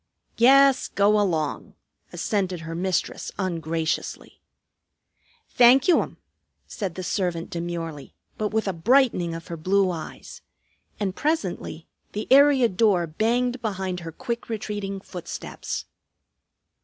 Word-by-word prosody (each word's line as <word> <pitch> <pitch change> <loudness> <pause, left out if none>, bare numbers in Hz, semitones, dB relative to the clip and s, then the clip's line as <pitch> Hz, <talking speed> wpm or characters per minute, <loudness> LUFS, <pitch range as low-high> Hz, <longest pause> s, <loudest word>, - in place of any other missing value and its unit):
"Yes, 270 +2 +6
go 205 +1 +3
along," 160 -7 -1 0.4
assented 185 -5 -2
her 165 0 -6
mistress 180 +1 -2
ungraciously. 165 -3 -3 1.1
"Thank 250 +2 +5
you, 355 - +5
'm," - - -7 0.5
said 195 -6 -5
the 185 - -5
servant 175 -3 -2
demurely, 170 -3 -5 0.2
but 215 - -1
with 220 0 -1
a 195 - 0
brightening 185 -3 +2
of 165 - -8
her 170 - -5
blue 190 +3 +2
eyes. 165 -3 -8 0.6
And 195 -3 -2
presently 190 - -2 0.3
the 210 +1 -4
area 275 -2 +6
door 195 -4 +2
banged 240 +9 0
behind 190 -4 -3
her 165 -1 -7
quick 235 +6 -5
retreating 205 -3 -4
footsteps. 180 -3 -6
195 Hz, 120 wpm, -24 LUFS, 170-230 Hz, 1.1 s, Yes